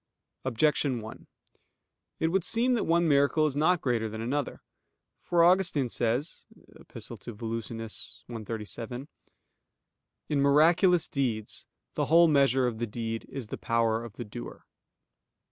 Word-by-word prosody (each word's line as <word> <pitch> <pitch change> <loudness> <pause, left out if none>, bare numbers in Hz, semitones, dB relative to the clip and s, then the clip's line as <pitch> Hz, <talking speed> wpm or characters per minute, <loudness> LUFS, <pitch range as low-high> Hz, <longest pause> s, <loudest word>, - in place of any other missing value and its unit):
Objection 130 0 +1
1: 110 0 -10 0.9
It 160 - +1
would 190 +1 +1
seem 235 +7 +3
that 235 - 0
one 170 +1 +2
miracle 145 +1 +3
is 145 -3 -1
not 160 +4 +2
greater 115 -4 0
than 110 +1 -7
another. 135 +5 -3 0.6
For 170 -1 +2
Augustine 175 -7 +3
says 120 +7 -2 0.3
(Epist. - - -11
ad - - -8 0.2
Volusian. 115 0 -4 0.5
cxxxvii): 115 +3 -6 1.2
"In 145 -2 +1
miraculous 165 +5 +4
deeds, 115 -6 -3 0.3
the - - 0
whole 170 +1 +6
measure 135 -4 +3
of 115 -3 -2
the 120 - -1
deed 115 +1 -4
is 130 -6 -7
the - - -6
power 115 -1 +1
of 115 -3 -9
the 120 - -7
doer." - - -9
135 Hz, 135 wpm, -28 LUFS, 115-160 Hz, 1.2 s, whole